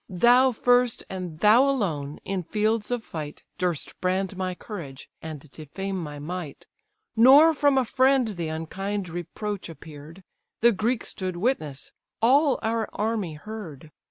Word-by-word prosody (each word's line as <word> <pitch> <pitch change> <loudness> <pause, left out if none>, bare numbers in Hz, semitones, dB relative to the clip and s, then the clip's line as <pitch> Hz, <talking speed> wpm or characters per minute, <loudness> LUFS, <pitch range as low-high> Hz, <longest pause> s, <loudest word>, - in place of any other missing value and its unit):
Thou 245 +8 +5
first, 245 0 +2
and 180 -4 -6
thou 235 +6 +6
alone, 155 - -2
in 195 -1 -2
fields 215 +4 -1
of 245 -2 -2
fight, 150 -6 -7 0.2
Durst 175 -4 -3
brand 190 +1 0
my 185 -1 -3
courage, 165 - -8
and 155 -2 -8
defame 190 +6 -5
my 150 -2 -6
might: 155 0 -6 0.5
Nor 275 +8 +8
from 285 -2 +3
a 260 - +3
friend 260 0 +3
the 175 -6 -4
unkind 185 +5 -4
reproach 175 +4 -5
appear'd, 160 +2 -12 0.4
The 235 +1 +6
Greeks 225 +3 -1
stood 185 -2 -4
witness, 165 - -2 0.3
all 275 +4 +4
our 225 0 -1
army 210 -7 -2
heard. 160 -5 -9
195 Hz, 140 wpm, -25 LUFS, 165-230 Hz, 0.5 s, Nor